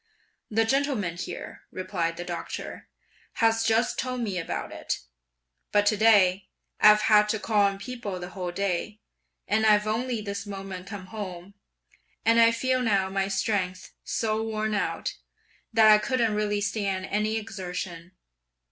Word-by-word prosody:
'The 225 +1 +2
gentleman 260 - 0
here,' 175 - -7
replied 180 -3 -3
the 175 - -4
doctor, 175 -1 -6 0.4
'has 225 -1 +2
just 225 +1 +1
told 255 -1 -2
me 200 -6 -2
about 165 - -4
it; - - -4 0.7
but 205 0 +3
to 215 - +3
day, 200 -3 +4 0.3
I've 210 0 +7
had 210 -1 +5
to 220 - 0
call 215 -1 +2
on 195 0 -3
people 205 -3 -6
the 175 0 -6
whole 180 -2 -4
day, 200 +3 -2 0.5
and 220 +1 +2
I've 210 -1 +5
only 235 +2 -1
this 200 -1 -5
moment 195 -2 -7
come 200 -2 -7
home; 190 -3 -7 0.7
and 230 +1 +5
I 230 - +7
feel 255 +2 0
now 200 -5 +1
my 195 0 0
strength 195 -2 -2
(so 220 -1 -1
worn 220 -1 -2
out), 205 - -2 0.5
that 220 -1 +6
I 210 - +7
couldn't 230 -1 +1
really 210 -1 0
stand 195 -2 -1
any 215 +2 0
exertion. 180 -4 -6
210 Hz, 150 wpm, -27 LUFS, 190-220 Hz, 0.7 s, I've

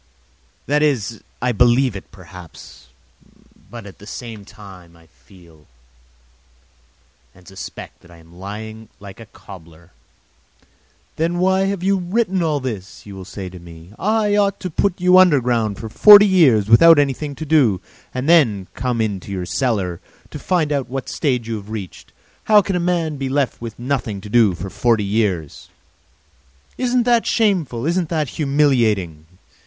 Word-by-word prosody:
That 150 +1 +1
is, 115 -7 -1 0.2
I 125 - +1
believe 120 +1 +2
it, 95 - -9
perhaps, 85 -8 -14 0.8
but 115 -1 -10
at 100 - -13
the 105 - -14
same 110 -3 -9
time 95 -5 -15
I 85 - -22
feel 80 -2 -21 1.7
and 90 -1 -20
suspect 95 -3 -10
that 90 - -20
I 85 - -16
am 85 +2 -18
lying 110 +3 -9
like 100 +1 -12
a 115 - -12
cobbler. 85 -4 -15 1.3
"Then 170 +2 -1
why 190 +1 +2
have 195 -2 -3
you 195 0 +1
written 190 +1 -1
all 155 -3 0
this?" 110 -7 -7
you 100 - -10
will 95 -1 -9
say 95 0 -8
to 90 0 -12
me. 85 +2 -14
"I 210 +2 +1
ought 200 -1 +1
to 185 - -5
put 190 +3 -1
you 180 +1 +5
underground 125 - +2
for 110 - -7
forty 205 - +8
years 145 - +3
without 165 +9 +7
anything 145 0 -1
to 155 - -7
do 140 - +2 0.3
and 130 +2 -4
then 115 - +3
come 125 -2 -3
to 115 - +1
you 105 -2 -1
in 95 - -8
your 95 -3 -4
cellar, 95 -5 -2 0.3
to 150 - -7
find 165 -2 -1
out 140 -4 -2
what 135 0 -5
stage 125 -7 -2
you 115 -1 -3
have 100 0 -11
reached! 105 -5 -8 0.3
How 210 -2 +5
can 195 - -3
a - - 0
man 170 -3 -1
be 135 -1 -4
left 140 -3 -1
with 115 -2 -8
nothing 120 -5 -3
to 105 - -10
do 110 -5 +3
for 95 +3 -7
forty 115 -4 +1
years?" 100 -7 -2 1.1
"Isn't 250 -1 0
that 235 -1 +2
shameful, 175 - 0
isn't 170 0 -1
that 155 -5 -2
humiliating?" 115 - 0
120 Hz, 165 wpm, -19 LUFS, 100-160 Hz, 1.7 s, forty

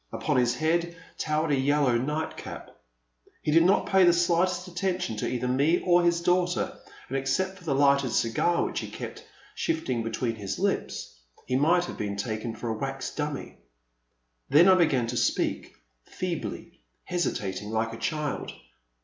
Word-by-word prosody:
Upon 150 -4 -1
his 125 -1 +2
head 170 +3 0 0.2
towered 155 0 0
a - - +4
yellow 140 -1 +2
night 150 +6 -2
cap. - - -8 0.7
He 150 - 0
did 165 +2 +6
not 185 +4 +4
pay 190 -1 +4
the 175 - +7
slightest 175 +1 +1
attention 180 - -2
to - - -2
either 125 0 -2
me 140 +7 +3
or 175 -1 +4
his 170 0 +2
daughter, 180 0 +1 0.3
and, 135 - -5
except 185 +9 -1
for 180 - -16
the 140 -4 0
lighted 140 -1 +4
cigar 120 +10 +1
which - - -3
he - - -6
kept - - -7 0.3
shifting 320 - -1
between 115 +1 -2
his 105 -4 -5
lips, - - -2 0.3
he 130 - -1
might 170 +6 +3
have - - -8
been 100 -1 -2
taken 110 +2 -3
for 120 - -5
a 110 - -2
wax 135 -1 -4
dummy. 150 -2 -4 0.9
Then 160 +6 +6
I 190 - +8
began 155 -9 +3
to 115 - -3
speak, - - 0 0.3
feebly, - - -5 0.2
hesitating 105 - -2
like 110 +1 -1
a - - -6
child. 150 -1 -3
150 Hz, 165 wpm, -27 LUFS, 125-175 Hz, 0.9 s, I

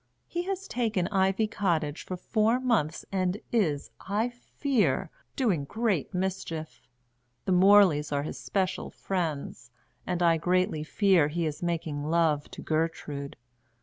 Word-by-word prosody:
He 345 - -3
has 390 0 -3
taken 220 -7 0
Ivy 195 +2 +2
Cottage 170 -8 -1
for 185 - -4
four 220 +5 +1
mouths, 220 - 0
and 185 0 0
is, 155 - 0
I 210 +5 -1
fear, 240 - -1 0.2
doing 205 - +1
great 210 - -1
mischief. 180 -4 -4 0.6
The - - 0
Morleys 185 -5 +5
are 140 0 0
his 155 - -6
special 190 -2 -1
friends, 160 -10 -3 0.4
and 180 -1 0
I 165 -1 +5
greatly 180 -1 +1
fear 185 -2 +3
he 165 +2 -1
is 150 -2 -3
making 165 -4 -2
love 155 -2 +1
to - - -9
Gertrude. 155 -3 -2
180 Hz, 135 wpm, -28 LUFS, 155-205 Hz, 0.6 s, Morleys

